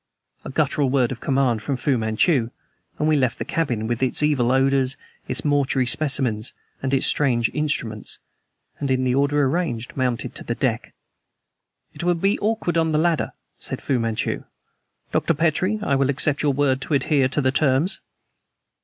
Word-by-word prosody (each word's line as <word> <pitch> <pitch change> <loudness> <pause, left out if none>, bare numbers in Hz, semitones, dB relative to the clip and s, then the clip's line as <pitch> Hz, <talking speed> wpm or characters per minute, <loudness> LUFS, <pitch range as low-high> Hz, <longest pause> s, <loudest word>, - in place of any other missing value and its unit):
A - - -7
guttural 145 -1 +1
word 130 -2 +2
of 125 - -5
command 130 -5 +1
from 140 +1 -2
Fu 135 +2 +1
Manchu, 115 +3 +1 0.5
and 150 - 0
we 155 - +4
left 130 -5 +1
the - - -4
cabin, 120 -10 -1
with 120 +2 -2
its 130 +3 +1
evil 135 -5 +2
odors, 135 0 +3 0.3
its - - -2
mortuary 140 -3 +2
specimens, 125 -4 +1 0.3
and 130 - -2
its 135 -1 +3
strange 120 -5 +2
instruments, 125 -8 -2 0.6
and 140 - -2
in 130 0 +1
the 125 -1 +1
order 140 +2 +2
arranged 130 -5 -1
mounted 125 -3 -1
to - - -5
the - - -3
deck. - - -2 1.0
"It 150 - -7
will 175 0 +2
be 195 +5 +1
awkward 210 -6 0
on 160 -1 +1
the - - +3
ladder," 165 0 +1 0.3
said - - -3
Fu 130 -3 0
Manchu. 115 -1 -2 0.7
"Dr. 165 - +1
Petrie, 170 +7 +1
I 140 - 0
will 135 0 +2
accept 140 +1 +1
your 145 -2 +2
word 135 -1 +1
to 145 - -1
adhere 135 0 +2
to 135 - -2
the 130 -2 +2
terms." 145 +6 +1
135 Hz, 175 wpm, -22 LUFS, 125-150 Hz, 1.0 s, we